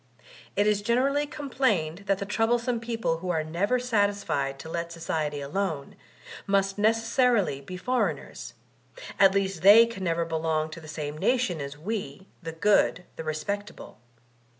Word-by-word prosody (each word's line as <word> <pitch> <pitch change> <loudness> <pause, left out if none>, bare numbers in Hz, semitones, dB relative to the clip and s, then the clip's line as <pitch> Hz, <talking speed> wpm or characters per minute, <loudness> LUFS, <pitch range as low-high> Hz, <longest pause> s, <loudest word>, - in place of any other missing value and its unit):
It 205 - +2
is 210 -1 +2
generally 270 +6 +1
complained 220 - -1
that 195 - +2
the 200 - -4
troublesome 235 +3 0
people 225 -7 -2
who 180 +1 -5
are 160 -3 0
never 180 +10 0
satisfied 205 - 0
to 135 - -9
let 170 +1 -4
society 155 -3 -3
alone, 155 -1 -3 0.5
must 195 0 +1
neces 225 +2 +2
sarily 225 - +2
be 180 +6 -7
foreigners; 250 +7 -2 0.6
at 195 0 +6
least 190 -4 0
they 210 +4 +9
can 230 -5 -7
never 170 -1 0
belong 160 -1 -1
to 165 - -9
the 155 - -12
same 150 -1 -5
nation 240 - +1
as 140 +1 -6
we, 190 -2 -5 0.2
the 165 -2 -5
good, 180 +1 +2
the - - -6
respectable. 180 - -5
195 Hz, 150 wpm, -27 LUFS, 160-225 Hz, 0.6 s, they